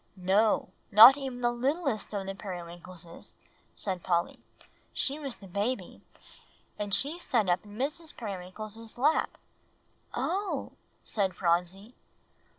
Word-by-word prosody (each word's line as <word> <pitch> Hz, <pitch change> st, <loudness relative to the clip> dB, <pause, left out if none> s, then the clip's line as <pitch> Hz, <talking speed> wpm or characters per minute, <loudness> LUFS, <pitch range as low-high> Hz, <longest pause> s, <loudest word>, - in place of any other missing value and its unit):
"No, 195 Hz, +4 st, +2 dB, 0.2 s
not 230 Hz, +6 st, +11 dB
even 265 Hz, -3 st, -5 dB
the 240 Hz, 0 st, +3 dB
littlest 265 Hz, -, -1 dB
of 200 Hz, -2 st, -3 dB
the 195 Hz, -, -3 dB
Periwinkleses," 175 Hz, -2 st, -9 dB, 0.4 s
said 185 Hz, -3 st, -3 dB
Polly. 170 Hz, -1 st, 0 dB, 0.5 s
"She 285 Hz, +2 st, -1 dB
was 275 Hz, -5 st, -5 dB
the 200 Hz, -, -13 dB
baby; 205 Hz, +7 st, -3 dB, 0.8 s
and 205 Hz, -1 st, -3 dB
she 290 Hz, -, 0 dB
sat 230 Hz, -, +1 dB
up 180 Hz, 0 st, +2 dB
in 205 Hz, 0 st, -11 dB
Mrs. 305 Hz, +5 st, -3 dB
Periwinkle's 215 Hz, +3 st, -7 dB
lap." 295 Hz, +6 st, +2 dB, 0.8 s
"Oh!" 395 Hz, +2 st, -1 dB, 0.3 s
said 195 Hz, -4 st, -1 dB
Phronsie. 180 Hz, +5 st, 0 dB
210 Hz, 120 wpm, -29 LUFS, 185-255 Hz, 0.8 s, not